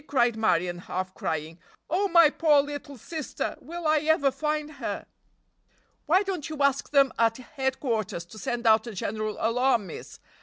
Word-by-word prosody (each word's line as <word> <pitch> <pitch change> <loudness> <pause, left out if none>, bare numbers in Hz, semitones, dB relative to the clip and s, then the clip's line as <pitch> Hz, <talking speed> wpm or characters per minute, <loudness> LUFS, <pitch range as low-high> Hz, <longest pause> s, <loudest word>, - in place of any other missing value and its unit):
cried 240 -4 +2
Marion, 180 -5 +1
half 185 +1 -4
crying. 165 -4 -4 0.3
"Oh, 385 +5 +1
my 335 -4 +6
poor 300 -3 +4
little 290 -1 -7
sister! 310 +5 -4
Will 340 +4 -7
I 310 0 +4
ever 305 -2 +2
find 300 +1 -2
her?" - - -3 1.0
"Why 370 +6 +4
don't 370 -7 -4
you 310 - -5
ask 280 -1 +1
them 275 -2 +4
at 225 -1 +3
headquarters 250 -8 -2
to 215 +5 -12
send 235 +3 -3
out 220 0 +5
a 225 - -7
general 215 +2 -3
alarm, 235 -1 +2
miss?" 170 - -9
260 Hz, 160 wpm, -27 LUFS, 215-305 Hz, 1.0 s, my